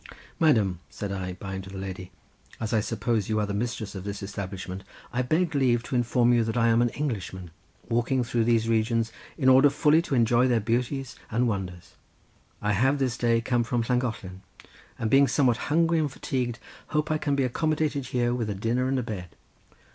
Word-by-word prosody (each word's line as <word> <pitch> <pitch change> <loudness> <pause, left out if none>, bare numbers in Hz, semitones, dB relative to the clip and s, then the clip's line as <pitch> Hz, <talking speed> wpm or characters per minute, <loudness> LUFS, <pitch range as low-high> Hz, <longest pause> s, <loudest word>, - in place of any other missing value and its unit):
"Madam!" 110 - +3
said 100 -1 -5
I, 95 -2 -3
bowing 95 0 -6
to 95 - -11
the 95 - -8
lady, 95 -1 -6 0.5
"as 110 -1 -3
I 110 - +4
suppose 115 -1 -1
you 110 0 +1
are 105 - +1
the 100 - -4
mistress 110 0 -3
of 95 -3 -6
this 100 0 -5
establishment, 95 -1 -6 0.3
I 125 - +1
beg 160 +6 +1
leave 125 -4 +2
to 130 - -4
inform 120 0 +3
you 120 -1 +3
that 115 +1 -2
I 115 -1 +4
am 115 +1 +4
an 120 - +3
Englishman 100 - -4 0.4
walking 120 +2 +1
through 115 -1 0
these 115 -1 +2
regions 115 0 +1 0.3
in 135 -5 +1
order 130 +2 +7
fully 150 +3 +3
to 160 -5 -2
enjoy 120 +1 +4
their 120 -2 +3
beauties 125 +4 -2
and 120 +2 +1
wonders. 90 -5 -4 0.7
I 105 0 +2
have 130 +8 +2
this 130 -3 0
day 115 -1 +2
come 120 0 +1
from 115 0 -1
Llangollen, 110 -7 -2 0.6
and 110 -1 -2
being 140 +1 +6
somewhat 130 -6 +2
hungry 165 +2 +3
and 150 -3 0
fatigued 125 -3 -2 0.3
hope 150 +1 -1
I 155 - +1
can 145 -2 0
be 140 - +1
accommodated, 150 +1 0
here 120 -1 0
with 115 -3 -2
a 105 - -2
dinner 115 +6 0
and 135 0 0
a 125 - -1
bed." 100 -7 -6
120 Hz, 200 wpm, -26 LUFS, 105-130 Hz, 0.7 s, order